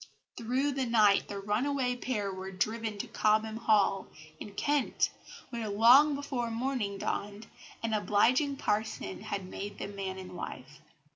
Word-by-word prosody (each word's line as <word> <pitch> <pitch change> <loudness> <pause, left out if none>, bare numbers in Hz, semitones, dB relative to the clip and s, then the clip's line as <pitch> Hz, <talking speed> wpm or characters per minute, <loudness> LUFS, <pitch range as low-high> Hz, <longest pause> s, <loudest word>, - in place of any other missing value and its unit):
Through 255 +5 0
the 265 -2 -1
night 215 -4 +4
the 200 - -5
runaway 250 +5 0
pair 210 -6 -2
were 190 0 -6
driven 215 +3 -2
to - - -4
Cobham 215 +1 +1
Hall, 210 -4 +2 0.3
in 205 -1 -9
Kent, 290 +4 +1 0.4
where, 230 -3 -3
long 250 +8 +6
before 265 -4 -3
morning 230 -4 -2
dawned, 205 +2 -3 0.4
an 225 -1 -1
obliging 245 +7 +3
parson 210 - -2
had 195 -2 -4
made 200 +2 -6
them 200 0 -6
man 190 -1 -4
and 185 -1 -9
wife. 135 -3 -8
215 Hz, 145 wpm, -30 LUFS, 200-250 Hz, 0.4 s, long